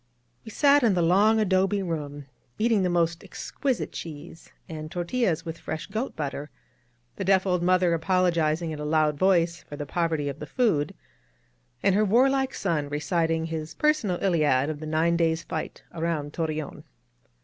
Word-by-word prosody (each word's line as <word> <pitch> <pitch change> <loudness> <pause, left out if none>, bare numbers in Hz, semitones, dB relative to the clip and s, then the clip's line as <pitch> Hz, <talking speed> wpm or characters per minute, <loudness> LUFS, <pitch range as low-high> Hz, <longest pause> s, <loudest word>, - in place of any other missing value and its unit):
We - - -9
sat 285 +5 +4
in 225 -6 +3
the 175 - +2
long 205 +6 +4
adobe 195 0 +2
room, 145 -4 -4 0.3
eating 225 -2 +2
the 180 - +1
most 170 -1 0
exquisite 250 +3 -3
cheese, 160 +1 -9 0.2
and 155 -1 -7
tortiUas 175 -1 -1
with 165 0 -6
fresh 155 - -5
goat 220 +6 -4
butter, 145 0 -4 0.3
— 120 0 -42
the 195 - -2
deaf 190 0 +3
old 180 -2 +1
mother 180 -1 +3
apologizing 170 -2 +1
in 155 - -6
a - - -4
loud 155 0 +2
voice 170 -3 +2
for 145 - -10
the 145 0 -5
poverty 160 -1 -1
of 140 +1 -5
the - - -7
food, 185 - +1 0.9
and 195 - +4
her 210 +2 +3
warlike 265 +5 +3
son 155 -6 -1
reciting 160 +2 0
his 160 -1 -5
personal 300 - +1
Iliad 155 -6 +2
of 150 - -7
the 155 - -6
nine 165 +2 +2
days' 165 -1 +1
fight - - -5
around 160 -3 -2
Tor 165 -2 -1
reon. 155 -1 -5
170 Hz, 170 wpm, -26 LUFS, 155-195 Hz, 0.9 s, sat